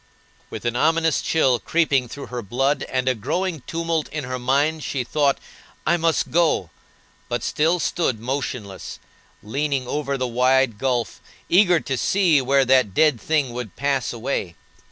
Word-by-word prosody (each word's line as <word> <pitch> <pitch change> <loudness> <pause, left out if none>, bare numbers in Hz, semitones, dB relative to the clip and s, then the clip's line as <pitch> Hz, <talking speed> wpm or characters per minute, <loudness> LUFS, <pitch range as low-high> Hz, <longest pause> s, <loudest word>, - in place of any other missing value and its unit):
With - - -8
an 120 0 0
ominous 160 +3 +2
chill 130 -7 +2
creeping 145 -6 +1
through 140 +4 -8
her 120 - -2
blood, 135 +7 0
and 130 0 -1
a 130 - +4
growing 160 - -2
tumult 165 -1 -2
in 150 -2 -4
her 130 0 -4
mind, 145 +5 +1
she 135 -3 -2
thought, 140 +2 +1 0.5
"I 170 - +3
must 165 -1 0
go," 160 - +2 0.6
but - - -2
still 165 +4 +1
stood 155 -8 0
motionless, 120 -5 -5 0.5
leaning 135 +3 -1
over 140 0 -2
the 130 - -1
wide 125 -1 +2
gulf, 125 -4 -1 0.3
eager 180 -2 +5
to 135 - -3
see 175 -8 +3
where 135 +1 +3
that 130 -7 +3
dead 150 -7 +3
thing 145 -6 0
would 120 -7 -6
pass 140 -2 0
away. 115 -7 -3
135 Hz, 155 wpm, -22 LUFS, 125-155 Hz, 0.6 s, eager